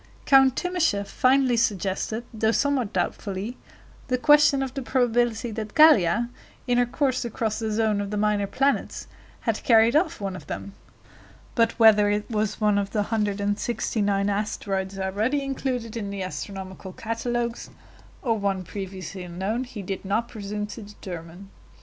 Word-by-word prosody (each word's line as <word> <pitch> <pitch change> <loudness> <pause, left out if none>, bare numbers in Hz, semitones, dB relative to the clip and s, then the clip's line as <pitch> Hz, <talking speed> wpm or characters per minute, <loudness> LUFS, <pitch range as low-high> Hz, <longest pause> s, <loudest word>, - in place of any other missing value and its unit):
Count 270 -2 +6
Timascheff 330 - 0
finally 255 +1 +3
suggested, 215 0 -1
though 220 0 +1
somewhat 265 -4 +1
doubtfully, 205 +4 -3 0.5
the 255 -1 +1
question 295 0 +5
of 260 -1 -5
the 275 - -4
probability 240 -2 +1
that 215 -1 -6
Gallia, 240 - +5 0.4
in 245 -1 +2
her 245 - +3
course 265 0 0
across 220 -2 -2
the 220 -1 -2
zone 215 -1 +1
of 200 - -4
the 210 - -3
minor 210 -1 +1
planets, 275 +7 0 0.4
had - - -1
carried 230 -1 +5
off 325 +5 +2
one 195 -2 -3
of - - -10
them; 200 - -6 0.8
but 230 -2 +2
whether 215 -2 +6
it 205 0 -1
was 215 -1 -1
one 210 -2 +3
of 200 -1 -2
the 210 0 0
169 205 -1 0
asteroids 195 -2 -2
already 210 +9 0
included 255 -4 -3
in 210 -3 -4
the 200 -1 -4
astronomical 190 0 -7
catalogues, 235 +2 -3 0.5
or 235 -4 +2
one 195 -2 -1
previously 190 0 -7
unknown, 190 +8 -3
he 230 -5 -8
did 190 +1 -4
not 210 +4 0
presume 210 -2 -5
to 210 +2 -9
determine. 190 -2 -9
215 Hz, 150 wpm, -25 LUFS, 200-245 Hz, 0.8 s, Count